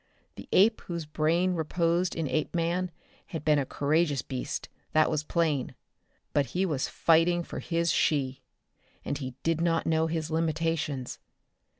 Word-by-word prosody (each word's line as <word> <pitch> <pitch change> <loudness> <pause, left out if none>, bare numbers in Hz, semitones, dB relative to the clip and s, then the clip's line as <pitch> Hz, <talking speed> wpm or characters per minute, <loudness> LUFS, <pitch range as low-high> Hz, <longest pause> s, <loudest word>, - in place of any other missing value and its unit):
The - - -11
ape 220 +4 +5
whose 170 -2 -5
brain 165 +4 +1
reposed 170 +2 0
in 165 -2 -1
Apeman 170 +4 0 0.4
had 160 -3 -6
been 150 -1 +4
a 135 - -2
courageous 145 -2 +1
beast, 130 -2 -4 0.3
that 155 0 +4
was 155 -1 0
plain. 155 -5 0 0.6
But 140 -2 +2
he 190 - +3
was 150 -7 -1
fighting 170 +1 +3
for - - -6
his 170 0 0
she. 135 -3 +1 0.6
And 140 - -2
he 130 -3 -5
did 165 0 +1
not 165 -1 +1
know 160 0 +2
his 160 -1 -3
limitations. 160 -4 -1
160 Hz, 150 wpm, -28 LUFS, 150-170 Hz, 0.6 s, ape